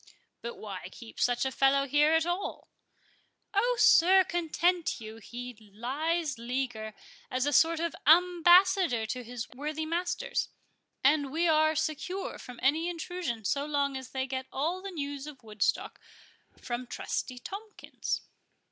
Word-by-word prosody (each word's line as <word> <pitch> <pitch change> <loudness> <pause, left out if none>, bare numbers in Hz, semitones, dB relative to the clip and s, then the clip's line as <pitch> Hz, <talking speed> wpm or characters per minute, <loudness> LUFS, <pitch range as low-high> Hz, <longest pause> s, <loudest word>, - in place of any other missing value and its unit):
"But 235 - -6
why 195 -4 -7
keep 225 +2 -12
such 245 +1 +2
a 265 - 0
fellow 275 +2 +3
here 295 +3 +4
at 320 0 +3
all?" 350 +3 -3 0.8
"Oh, 480 +5 +2
sir, 375 +3 +7
content 345 -1 0
you;—he 230 +3 -8 0.2
lies 290 +4 -1
leaguer, 235 -3 -3 0.3
as 255 +1 0
a 290 - 0
sort 325 +1 +4
of 335 0 -2
ambassador 355 - +5
for 250 +3 -4
his 240 -2 -6
worthy 300 +4 -4
masters, 350 +2 -2 0.5
and 285 0 +3
we 335 +4 +1
are 310 0 +4
secure 315 +5 -3
from 250 -1 -10
any 315 +6 +2
intrusion 335 - -4
so 280 +7 +1
long 280 -2 0
as 260 -1 -6
they 260 -1 -2
get 260 0 -4
all 330 +7 -1
the 395 - -6
news 285 -4 -5
of 280 -5 -11
Woodstock 215 -2 -1 0.6
from 245 0 -4
Trusty 250 +1 -4
Tomkins." 410 - -5
290 Hz, 140 wpm, -29 LUFS, 250-340 Hz, 0.8 s, sir